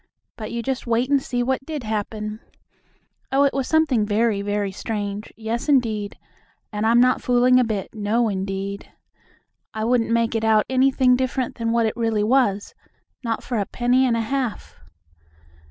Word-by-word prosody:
But 215 Hz, -2 st, -7 dB
you 235 Hz, 0 st, -3 dB
just 265 Hz, -1 st, -3 dB
wait 235 Hz, +3 st, +1 dB
and 280 Hz, -1 st, +4 dB
see 245 Hz, -2 st, -2 dB
what 265 Hz, +1 st, -1 dB
did 300 Hz, -2 st, -5 dB
happen. 215 Hz, 0 st, -4 dB, 0.9 s
Oh, 275 Hz, +1 st, +4 dB
it 280 Hz, -, +2 dB
was 270 Hz, -2 st, -1 dB
something 315 Hz, -8 st, +2 dB
very, 210 Hz, 0 st, +1 dB
very 205 Hz, -1 st, -1 dB
strange, 205 Hz, 0 st, -4 dB
yes, 230 Hz, +5 st, -3 dB
indeed, 220 Hz, -7 st, +1 dB, 0.5 s
and 210 Hz, +1 st, -1 dB
I'm 235 Hz, +1 st, +5 dB
not 255 Hz, +1 st, +3 dB
fooling 250 Hz, +1 st, +4 dB
a -, -, +4 dB
bit; 215 Hz, -4 st, -3 dB
no, 220 Hz, +2 st, 0 dB
indeed. 195 Hz, 0 st, -4 dB, 0.8 s
I 220 Hz, 0 st, -2 dB
wouldn't 235 Hz, -1 st, +1 dB
make 230 Hz, 0 st, +1 dB
it 225 Hz, -1 st, -1 dB
out 220 Hz, -1 st, +3 dB
anything 260 Hz, -1 st, +3 dB
different 255 Hz, 0 st, -1 dB
than 230 Hz, 0 st, 0 dB
what 230 Hz, 0 st, +2 dB
it 220 Hz, -, -1 dB
really 225 Hz, -3 st, 0 dB
was, 215 Hz, -4 st, +1 dB, 0.5 s
not 230 Hz, -2 st, -2 dB
for 240 Hz, -3 st, -2 dB
a 200 Hz, -, 0 dB
penny 250 Hz, +2 st, +2 dB
and 230 Hz, -2 st, +1 dB
a -, -, 0 dB
half. 250 Hz, 0 st, -3 dB
230 Hz, 170 wpm, -22 LUFS, 215-255 Hz, 0.9 s, I'm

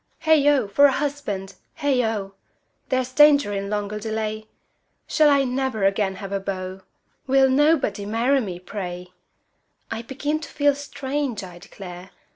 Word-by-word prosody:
Heigh 315 Hz, -2 st, +4 dB
ho! 285 Hz, -7 st, +4 dB
for 280 Hz, +9 st, +5 dB
a -, -, +1 dB
husband! 265 Hz, -10 st, -3 dB, 0.2 s
Heigh 285 Hz, -4 st, +1 dB
ho! 210 Hz, -4 st, -2 dB, 0.6 s
There's 255 Hz, -1 st, -1 dB
danger 285 Hz, -6 st, +5 dB
in 200 Hz, 0 st, -3 dB
longer 210 Hz, 0 st, -3 dB
delay! 215 Hz, 0 st, -4 dB, 0.6 s
Shall 305 Hz, -2 st, +4 dB
I 280 Hz, -1 st, +4 dB
never 255 Hz, -4 st, -2 dB
again 195 Hz, 0 st, +1 dB
have 195 Hz, +1 st, -8 dB
a 200 Hz, -, -1 dB
beau? 190 Hz, -1 st, -5 dB, 0.5 s
Will 270 Hz, 0 st, +5 dB
nobody 270 Hz, -8 st, +2 dB
marry 240 Hz, +6 st, +2 dB
me, 185 Hz, -6 st, -5 dB
pray! 180 Hz, -2 st, -6 dB, 0.8 s
I 225 Hz, 0 st, -3 dB
begin 290 Hz, +5 st, -3 dB
to 315 Hz, -, -9 dB
feel 290 Hz, -1 st, +2 dB
strange, 275 Hz, -4 st, -4 dB
I 175 Hz, -2 st, -10 dB
declare! 180 Hz, -1 st, -10 dB
225 Hz, 150 wpm, -23 LUFS, 195-280 Hz, 0.8 s, for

